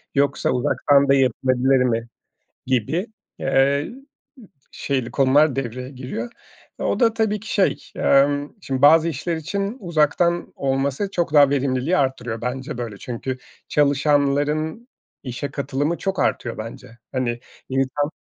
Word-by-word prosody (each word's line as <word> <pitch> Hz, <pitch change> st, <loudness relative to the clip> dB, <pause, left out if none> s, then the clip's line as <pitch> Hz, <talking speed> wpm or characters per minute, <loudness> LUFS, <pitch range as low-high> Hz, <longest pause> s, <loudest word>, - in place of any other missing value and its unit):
yoksa 140 Hz, 0 st, +1 dB
uzaktan 140 Hz, +3 st, +3 dB
da -, -, +6 dB
yapılabilir 130 Hz, 0 st, +2 dB
mi? 115 Hz, -2 st, -1 dB, 0.6 s
Gibi, 130 Hz, -, 0 dB, 0.3 s
eee, 140 Hz, +2 st, +2 dB
ımm, 270 Hz, +3 st, -13 dB, 0.7 s
şeyli 130 Hz, -4 st, -2 dB
konular 140 Hz, +2 st, +4 dB
devreye 125 Hz, -1 st, -4 dB
giriyor. 135 Hz, -, -6 dB, 0.5 s
O -, -, -1 dB
da 230 Hz, -2 st, +4 dB
tabii 220 Hz, -2 st, 0 dB
ki, 220 Hz, +2 st, -6 dB
şey, 195 Hz, -, +1 dB
emm, 145 Hz, +1 st, +2 dB
şimdi 135 Hz, -4 st, -3 dB
bazı 160 Hz, +3 st, +7 dB
işler 165 Hz, +2 st, -2 dB
için 200 Hz, -, -3 dB
uzaktan 170 Hz, -, +1 dB
olması 135 Hz, +7 st, -1 dB
çok 170 Hz, -5 st, -1 dB
daha 145 Hz, -2 st, +7 dB
verimliliği 140 Hz, +4 st, +1 dB
artırıyor. 125 Hz, -4 st, -1 dB
Bence 125 Hz, +1 st, -4 dB
böyle. 115 Hz, -4 st, -5 dB
Çünkü 125 Hz, +3 st, -5 dB, 0.3 s
çalışanların 145 Hz, -, +1 dB, 0.4 s
işe 130 Hz, +2 st, -5 dB
katılımı 145 Hz, +4 st, -2 dB
çok 195 Hz, -1 st, -3 dB
artıyor 120 Hz, -, -1 dB
bence. 115 Hz, +1 st, -9 dB
Hani, 120 Hz, -2 st, -1 dB, 0.3 s
insan 135 Hz, +3 st, 0 dB
140 Hz, 130 wpm, -22 LUFS, 130-155 Hz, 0.7 s, bazı